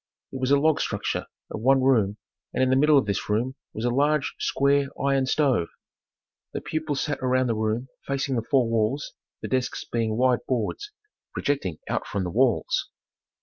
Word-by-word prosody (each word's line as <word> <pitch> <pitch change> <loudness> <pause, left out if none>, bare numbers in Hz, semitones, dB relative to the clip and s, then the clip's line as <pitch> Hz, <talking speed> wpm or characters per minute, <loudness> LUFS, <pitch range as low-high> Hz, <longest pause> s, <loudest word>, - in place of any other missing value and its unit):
It 130 - -5
was 130 - +1
a 140 - +6
log 155 +1 +3
structure - - -2 0.2
of 110 - -5
one 135 +2 +4
room, 110 -6 +3 0.4
and 130 - +2
in 130 - +2
the - - +4
middle 150 +2 +5
of 135 - +3
this 100 0 -2
room 115 +5 0 0.2
was 110 - -4
a 120 - +2
large, 145 +3 +1
square, 140 0 +2
iron 135 -1 +1
stove. 130 - +2 0.9
The - - -3
pupils 155 -3 -2
sat 150 -2 -2
around 130 0 +2
the 115 -2 0
room 110 +3 -1 0.2
facing 135 -1 -1
the 115 - +1
four 130 -4 +3
walls, 115 +5 0 0.3
the - - -2
desks 130 -1 -1
being 110 -2 -1
wide 125 -1 +3
boards, 130 - -2 0.4
projecting 100 - -1
out - - -2
from 100 - -2
the 90 - -3
walls. 120 +2 +1
130 Hz, 185 wpm, -25 LUFS, 115-140 Hz, 0.9 s, a